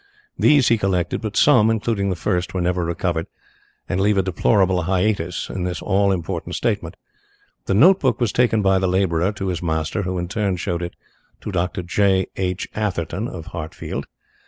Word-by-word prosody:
These 145 Hz, -4 st, +4 dB
he 115 Hz, -, +3 dB
collected, 95 Hz, -3 st, 0 dB
but 110 Hz, -1 st, -4 dB
some, 120 Hz, -7 st, +5 dB
including 110 Hz, -3 st, 0 dB
the 95 Hz, -, -1 dB
first, 90 Hz, +1 st, -2 dB
were 90 Hz, -, 0 dB
never 90 Hz, 0 st, 0 dB
recovered, 85 Hz, 0 st, -2 dB, 0.6 s
and 90 Hz, -, -1 dB
leave 105 Hz, 0 st, +2 dB
a 95 Hz, -, +3 dB
deplorable 95 Hz, 0 st, +2 dB
hiatus 90 Hz, -1 st, 0 dB
in 95 Hz, -, -4 dB
this 90 Hz, -3 st, -3 dB
all 100 Hz, 0 st, +2 dB
important 85 Hz, -4 st, -3 dB
statement. -, -, -2 dB, 0.7 s
The 95 Hz, -, +1 dB
note 180 Hz, -, +6 dB
book 130 Hz, -5 st, +1 dB
was 120 Hz, -5 st, +1 dB
taken 115 Hz, -3 st, +2 dB
by 95 Hz, -1 st, +3 dB
the 95 Hz, -, +1 dB
labourer 90 Hz, -1 st, +1 dB
to 95 Hz, -2 st, -4 dB
his 90 Hz, -3 st, -3 dB
master, 80 Hz, +4 st, -1 dB
who 95 Hz, -1 st, -3 dB
in 90 Hz, 0 st, -2 dB
turn 100 Hz, 0 st, -1 dB
showed 85 Hz, 0 st, -2 dB
it 85 Hz, -, -5 dB, 0.5 s
to -, -, -5 dB
Dr. 90 Hz, 0 st, -2 dB
J. 95 Hz, +1 st, +2 dB
H. 90 Hz, 0 st, -2 dB
Atherton, 95 Hz, 0 st, -2 dB
of 80 Hz, -8 st, -8 dB
Hartfield. 80 Hz, -3 st, -5 dB
95 Hz, 180 wpm, -21 LUFS, 90-105 Hz, 0.7 s, note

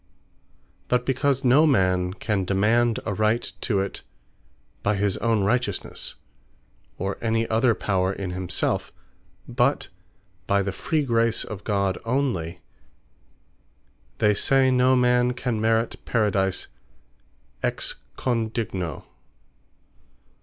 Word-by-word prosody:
But 125 Hz, 0 st, +1 dB
because 135 Hz, +1 st, +1 dB
no 135 Hz, +5 st, +5 dB
man 95 Hz, -7 st, +2 dB
can 105 Hz, -3 st, -1 dB
demand 110 Hz, +5 st, +2 dB
a 105 Hz, -, -1 dB
right 110 Hz, +4 st, +1 dB, 0.2 s
to 100 Hz, -5 st, +1 dB
it, 95 Hz, -, -5 dB, 0.8 s
by 100 Hz, +1 st, +1 dB
his 100 Hz, -1 st, +1 dB
own 115 Hz, -2 st, +1 dB
Righteousnesse, 120 Hz, +5 st, -1 dB, 0.8 s
or 95 Hz, +1 st, -3 dB
any 115 Hz, 0 st, 0 dB
other 115 Hz, +1 st, +3 dB
power 95 Hz, -2 st, 0 dB
in 95 Hz, -2 st, -4 dB
himselfe, 90 Hz, 0 st, -1 dB, 0.6 s
but 125 Hz, +3 st, +1 dB, 0.6 s
by 100 Hz, 0 st, +2 dB
the 100 Hz, -, -2 dB
Free 155 Hz, +9 st, -1 dB
Grace 115 Hz, -2 st, +1 dB
of 105 Hz, -2 st, -8 dB
God 100 Hz, -3 st, 0 dB
onely; 115 Hz, -10 st, -1 dB, 1.6 s
they 105 Hz, -2 st, +3 dB
say, 130 Hz, +5 st, +3 dB
no 130 Hz, +1 st, +4 dB
man 125 Hz, 0 st, +3 dB
can 125 Hz, -3 st, -2 dB
Merit 115 Hz, +1 st, 0 dB
Paradise 100 Hz, -4 st, +1 dB, 1.0 s
Ex -, -, -1 dB, 0.2 s
Condigno. 110 Hz, -, -2 dB
110 Hz, 110 wpm, -24 LUFS, 100-125 Hz, 1.6 s, no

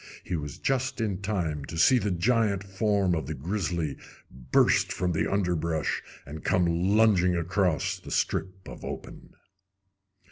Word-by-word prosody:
He 90 Hz, -, -3 dB
was 75 Hz, -3 st, -5 dB
just 135 Hz, -1 st, -1 dB
in 100 Hz, -4 st, -2 dB
time 85 Hz, -8 st, -2 dB
to 85 Hz, -, -7 dB
see 125 Hz, +10 st, +5 dB
the 105 Hz, -, -1 dB
giant 100 Hz, +1 st, +1 dB
form 100 Hz, -1 st, +1 dB
of 80 Hz, -2 st, -2 dB
the -, -, -3 dB
grizzly 85 Hz, -1 st, -2 dB, 0.3 s
burst 60 Hz, 0 st, +2 dB
from 90 Hz, -1 st, -1 dB
the 80 Hz, -, 0 dB
underbrush 85 Hz, -5 st, 0 dB, 0.2 s
and 75 Hz, +2 st, -8 dB
come 90 Hz, -1 st, +2 dB
lunging 90 Hz, +1 st, +3 dB
across 90 Hz, -1 st, 0 dB
the -, -, -11 dB
strip 95 Hz, 0 st, -2 dB
of -, -, -10 dB
open. -, -, -8 dB
90 Hz, 145 wpm, -27 LUFS, 85-100 Hz, 0.3 s, see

